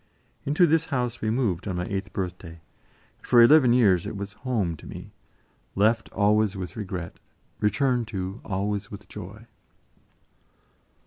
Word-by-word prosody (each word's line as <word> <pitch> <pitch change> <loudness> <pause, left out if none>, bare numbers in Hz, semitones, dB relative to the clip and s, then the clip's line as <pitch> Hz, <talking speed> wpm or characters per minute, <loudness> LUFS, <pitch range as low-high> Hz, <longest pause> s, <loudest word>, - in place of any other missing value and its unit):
Into 150 +5 +4
this 165 0 +2
house 125 -6 -2
we 110 - 0
moved 110 -7 0
on 95 - -2
my 90 0 -2
eighth 100 +2 -4
birthday, 90 -3 -5 0.6
and - - -16
for 120 - +5
eleven 125 +1 +7
years 100 -8 +4
it - - -5
was 100 0 -6
"home" 110 -10 -2
to - - -13
me, - - -9 0.6
left 110 +3 +2
always 105 0 +2
with 90 -3 -6
regret, 90 -5 -6 0.4
returned 120 +2 +1
to 95 -1 -5
always 100 +1 -2
with 100 - -10
joy. - - -10
105 Hz, 145 wpm, -26 LUFS, 95-120 Hz, 0.6 s, eleven